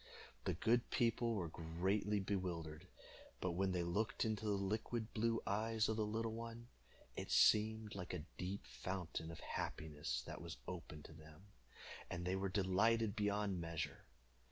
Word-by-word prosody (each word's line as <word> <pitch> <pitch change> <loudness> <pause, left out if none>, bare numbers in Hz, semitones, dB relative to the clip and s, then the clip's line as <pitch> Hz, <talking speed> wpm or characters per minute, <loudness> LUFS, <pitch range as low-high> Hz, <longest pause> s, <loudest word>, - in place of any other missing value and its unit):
The 95 -3 +1
good 115 +6 +3
people 115 0 +2
were 90 -5 0
greatly 95 +6 0
bewildered; 90 -4 -2 0.5
but 90 - 0
when 95 +2 +1
they 90 -1 +1
looked 100 +8 +1
into 110 0 -1
the 105 - +3
liquid 110 +3 -1
blue 115 +1 +2
eyes 110 +2 +2
of 110 - +1
the 110 -1 +1
little 110 +1 -1
one, 115 +1 -6 0.5
it - - -4
seemed 110 0 +5
like 90 -3 -4
a 85 -4 -4
deep 95 +2 -3
fountain 90 -3 -3
of 85 - -7
happiness 75 -2 -2
that - - -6
was 85 -1 -6
opened 80 -4 -6
to - - -10
them, 80 +5 -14 0.6
and 90 -1 -3
they 90 +1 +1
were 95 0 0
delighted 105 +3 +3
beyond 105 -3 +1
measure. 85 -1 -3
100 Hz, 155 wpm, -41 LUFS, 85-110 Hz, 0.6 s, seemed